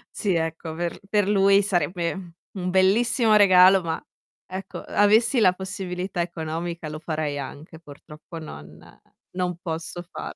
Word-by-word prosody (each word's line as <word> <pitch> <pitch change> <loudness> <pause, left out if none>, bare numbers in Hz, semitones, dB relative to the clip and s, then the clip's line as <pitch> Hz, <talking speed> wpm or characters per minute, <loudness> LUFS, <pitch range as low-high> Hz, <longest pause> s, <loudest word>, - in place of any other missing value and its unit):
Sì, 195 -4 0
ecco, 165 0 -3
aver 170 +2 -4
per 205 -2 +2
lui 200 0 +4
sarebbe, 175 -2 -1
mhmm, 180 -3 -9 0.2
un 180 -1 -3
bellissimo 215 +4 +3
regalo, 190 -2 +7
ma, 165 -1 -3 0.5
ecco, 190 +1 -7
uhm, - - -10
avessi 220 +5 +4
la 185 -4 +5
possibilità 185 -1 -4
economica 170 0 -4
lo 155 0 -6
farei 155 -3 -3
anche. 145 +4 -9
Purtroppo 150 +2 -12
non 75 - -10 0.6
non 180 -1 -2
posso 170 0 -5
far - - -7
180 Hz, 145 wpm, -24 LUFS, 160-195 Hz, 0.6 s, regalo